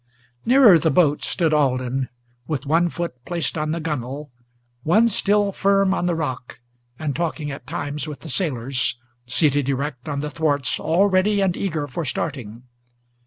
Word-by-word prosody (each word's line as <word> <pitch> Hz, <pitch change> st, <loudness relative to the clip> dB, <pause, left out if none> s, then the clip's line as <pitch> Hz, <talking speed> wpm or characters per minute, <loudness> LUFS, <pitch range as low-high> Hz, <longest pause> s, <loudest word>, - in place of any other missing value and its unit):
Nearer 240 Hz, -9 st, +7 dB
the 160 Hz, -, +1 dB
boat 150 Hz, -1 st, +3 dB
stood 165 Hz, -4 st, 0 dB
Alden, 130 Hz, -2 st, 0 dB, 0.4 s
with 150 Hz, -2 st, -3 dB
one 165 Hz, +4 st, +2 dB
foot 170 Hz, -9 st, -5 dB
placed 170 Hz, +3 st, -2 dB
on 155 Hz, -1 st, -2 dB
the 165 Hz, +2 st, -1 dB
gunwale, 145 Hz, -2 st, -4 dB, 0.5 s
One 210 Hz, -, +4 dB
still 205 Hz, -1 st, +2 dB
firm 195 Hz, 0 st, +2 dB
on 180 Hz, -, -1 dB
the 175 Hz, -, +1 dB
rock, 130 Hz, -6 st, -4 dB, 0.4 s
and 150 Hz, -3 st, -3 dB
talking 160 Hz, -3 st, -2 dB
at 135 Hz, -, -9 dB
times 145 Hz, +2 st, -3 dB
with 150 Hz, -2 st, -7 dB
the -, -, -10 dB
sailors, 125 Hz, -5 st, -1 dB, 0.3 s
Seated 140 Hz, +1 st, +2 dB
erect 140 Hz, 0 st, -3 dB
on 140 Hz, -1 st, -2 dB
the 150 Hz, 0 st, -4 dB
thwarts, 145 Hz, -4 st, 0 dB
all 165 Hz, +6 st, +2 dB
ready 200 Hz, +2 st, +2 dB
and 190 Hz, -3 st, +1 dB
eager 155 Hz, -7 st, -2 dB
for 165 Hz, +5 st, -4 dB
starting. 125 Hz, -5 st, -4 dB
155 Hz, 165 wpm, -22 LUFS, 135-175 Hz, 0.5 s, Nearer